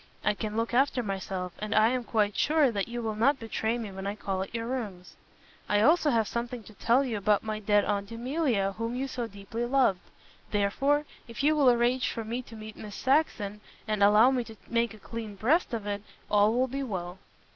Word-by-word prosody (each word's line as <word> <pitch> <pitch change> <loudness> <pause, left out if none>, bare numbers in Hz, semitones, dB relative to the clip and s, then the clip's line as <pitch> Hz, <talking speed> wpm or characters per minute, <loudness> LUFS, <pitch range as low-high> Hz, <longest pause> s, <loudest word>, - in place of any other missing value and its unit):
I 210 - +3
can 215 +1 -4
look 230 +1 -1
after 260 0 +2
myself, 190 -3 -4
and 215 +1 -2
I 215 +1 +6
am 250 0 -1
quite 210 -3 +1
sure 300 -4 +3
that 200 -3 -2
you 240 0 -5
will 220 -1 -1
not 255 +7 +3
betray 225 0 -1
me 220 -4 -5
when 190 +1 -6
I 200 - -2
call 195 -3 -3
at 195 - -5
your 230 0 -2
rooms. 210 -8 -5 0.5
I 205 0 +3
also 310 +5 +4
have 225 -5 +2
something 235 0 -4
to 215 - -14
tell 235 +6 +3
you 235 -4 -2
about 205 0 +2
my 215 -1 -3
dead 205 0 +3
Aunt 200 -1 -1
Emilia 240 -4 0
whom 230 +1 -2
you 265 +2 -2
so 245 -3 -4
deeply 200 +3 -6
loved. 240 -6 +3 0.5
Therefore, 270 +9 +1 0.2
if 230 +3 -5
you 305 +2 +4
will 280 -4 +5
arrange 245 +2 +2
for 230 - -4
me 235 +3 -3
to 235 -2 -13
meet 215 0 -9
Miss 210 -1 -8
Saxon, 240 -8 0 0.3
and 215 -1 -1
allow 210 +5 +6
me 255 -2 0
to 225 - -11
make 235 -1 0
a - - -13
clean 220 -1 -7
breast 280 - +2
of 225 -3 -3
it, 205 0 -3 0.3
all 210 +1 +5
will 250 +3 +2
be 275 +2 -4
well." 185 -7 -4
225 Hz, 220 wpm, -28 LUFS, 205-250 Hz, 0.5 s, I